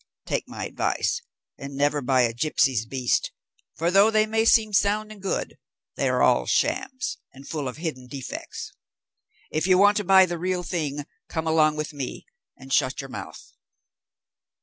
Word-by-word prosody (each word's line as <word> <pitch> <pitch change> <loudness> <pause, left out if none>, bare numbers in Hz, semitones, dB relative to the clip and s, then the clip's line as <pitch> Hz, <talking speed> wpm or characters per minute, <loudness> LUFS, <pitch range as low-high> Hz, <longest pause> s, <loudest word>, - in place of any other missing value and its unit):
Take - - -2
my - - -6
advice, 485 - -1 0.4
and 140 0 -7
never 145 +1 +1
buy 130 0 +3
a 115 -1 +1
gipsy's 125 -3 +1
beast, 135 - 0 0.4
for 170 +2 0
though 200 +3 +6
they 215 -1 +3
may 220 +1 +1
seem 220 -2 +4
sound 210 +1 +2
and 210 -2 -12
good, 195 - -3 0.4
they - - 0
are - - +2
all - - +3
shams, 255 -1 -1
and 135 +1 -13
full 150 -4 -3
of 125 - -6
hidden 155 -6 -5
defects. 135 0 -7 0.8
If 155 +4 0
you 185 -1 +5
want 205 +2 +5
to 210 - 0
buy 190 0 +7
the 175 -2 -4
real 180 0 -1
thing, 150 -5 -3 0.2
come 160 0 -3
along 155 -1 +3
with 155 0 -4
me, 140 -3 -6 0.3
and 135 0 -7
shut 130 0 +2
your 135 -1 -6
mouth." - - -9
160 Hz, 170 wpm, -25 LUFS, 135-200 Hz, 0.8 s, buy